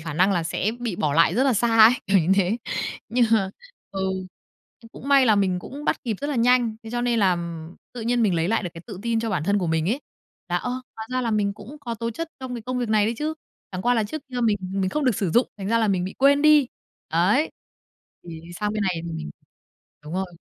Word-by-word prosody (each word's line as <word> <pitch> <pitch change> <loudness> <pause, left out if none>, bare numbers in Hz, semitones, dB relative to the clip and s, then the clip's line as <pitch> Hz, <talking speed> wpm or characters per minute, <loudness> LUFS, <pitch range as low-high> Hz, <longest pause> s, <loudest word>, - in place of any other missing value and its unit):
khả 160 -2 -6
năng 185 +4 +3
là 175 - +1
sẽ 180 +5 -1
bị 225 -7 -3
bỏ 145 -2 0
lại 165 +1 +4
rất 255 +5 +3
là 270 - +3
xa 225 +1 +2
ấy, 220 +1 +10 0.2
kiểu 195 0 +4
như 180 +2 +2
thế. 195 +3 +2 0.5
Nhưng 240 +2 +3
mà 195 -4 +3 0.4
ừ, 195 - -4 0.8
ừ, 230 - -15
cũng 275 - -9
may 275 -2 +6
là 215 -2 +5
mình 190 -3 +1
cũng 280 +10 -9
bắt - - 0
kịp 225 -4 -1
rất 285 - -2
là 290 -2 -2
nhanh. 240 -1 +3
Thế 225 - -9
cho 240 +1 -1
nên 240 -1 +1
là, 195 -3 +4
ừm, 170 -1 -6 0.2
tự 245 - -7
nhiên 235 +1 +1
mình 195 -5 +2
lấy 165 +1 0
lại 225 +1 +1
được 180 - -4
cái 165 - -8
tự 185 - -8
tin 230 -1 0
cho 225 -1 -2
bản 170 -6 -1
thân 200 +3 +2
của 180 - -1
mình 160 +1 0
ấy, 255 +8 0 0.5
là, 175 - +1
"Ơ, 245 - -2 0.3
hóa 220 - -6
ra 255 - +1
là 235 -2 -1
mình 205 -2 +1
cũng 215 +8 -11
có 240 -4 -4
tố 230 +1 -3
chất 330 +8 -5
trong 260 -1 -5
cái 235 - -6
công 250 +2 -3
việc 245 -2 -2
này 215 -1 +3
đấy 230 - -1
chứ, 310 +1 -2 0.4
chẳng 185 0 -4
qua 245 +3 +3
là 225 -2 +1
trước 305 +8 -6
kia 250 -2 -4
mình 220 -3 +3
mình 190 0 -2
không 300 +5 -1
được 250 -4 +3
sử 190 -3 -1
dụng, 240 +9 +3
thành 195 0 -4
ra 230 - +3
là 220 -2 +2
mình 185 -3 +1
bị 190 - -6
quên 280 +2 +5
đi." 300 -3 +6 0.4
Ấy, 185 - +2 0.7
thì, 165 -2 -8 0.2
sang 210 0 -1
bên 215 -1 -1
này 190 -2 +1
thì 170 - -5
mình 115 - -5 0.7
đúng 150 - -8
rồi. 190 +1 -1
215 Hz, 270 wpm, -24 LUFS, 185-245 Hz, 0.8 s, ấy